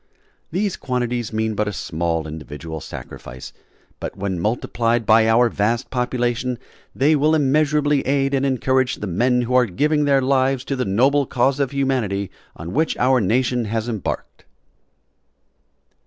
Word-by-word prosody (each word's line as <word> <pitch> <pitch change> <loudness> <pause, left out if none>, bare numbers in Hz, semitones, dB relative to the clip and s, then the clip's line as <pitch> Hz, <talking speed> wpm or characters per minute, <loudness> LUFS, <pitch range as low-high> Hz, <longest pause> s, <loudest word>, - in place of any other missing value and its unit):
These 195 +3 -1
quantities 125 -3 -2
mean 110 0 -1
but 105 0 -1
a - - -1
small 80 -3 -2
individual 80 +1 -7
sacrifice, 65 +1 -9 0.5
but - - -6
when 95 -2 -2
multiplied 115 +3 0
by 110 +1 +5
our 120 +2 +5
vast 115 +3 -1
population 125 0 -1 0.4
they 150 +4 +3
will 150 +2 +3
immeasurably 145 0 +2
aid 135 0 +1
and 135 -1 +1
encourage 130 -1 +1
the - - -6
men 125 +7 +1
who 125 +1 -3
are 125 -1 +4
giving 150 - +1
their 140 -1 +4
lives 130 0 +1
to 135 - -3
the 125 - -1
noble 130 +8 +2
cause 135 +2 +1
of 140 -2 +1
humanity 125 -9 -1 0.2
on 85 +2 -7
which 160 +4 0
our 130 0 +3
nation 120 +3 +1
has 110 +2 -2
embarked. 110 -6 -5
125 Hz, 150 wpm, -21 LUFS, 110-135 Hz, 0.5 s, by